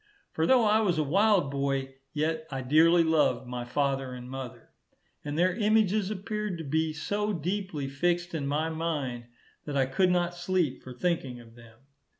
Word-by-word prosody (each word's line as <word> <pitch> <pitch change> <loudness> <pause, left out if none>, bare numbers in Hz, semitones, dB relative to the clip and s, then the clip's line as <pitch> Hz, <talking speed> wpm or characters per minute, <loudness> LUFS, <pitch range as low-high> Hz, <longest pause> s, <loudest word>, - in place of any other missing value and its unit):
For 160 - 0
though 255 -3 +5
I 215 +1 +4
was 185 -6 +1
a 155 - +2
wild 190 -1 +3
boy, 135 -1 -1 0.2
yet 160 +1 -2
I 135 -2 -4
dearly 165 +6 +5
loved 145 -6 +2
my 125 0 -5
father 135 0 -1
and 125 0 -9
mother, 130 -2 -8 0.5
and 145 0 -4
their 180 +2 +2
images 215 -2 +2
appeared 210 -1 -3
to 165 - -6
be 160 +2 0
so 205 +7 -2
deeply 175 -3 -3
fixed 175 +5 -1
in 145 -4 -2
my 155 +3 0
mind, 145 -7 -3 0.4
that 145 -2 -3
I 135 - +3
could 180 +8 +2
not 175 -1 +1
sleep 175 -5 -1
for 130 - -10
thinking 135 -6 -2
of 115 -1 -15
them. 115 0 -17
160 Hz, 175 wpm, -28 LUFS, 135-180 Hz, 0.5 s, though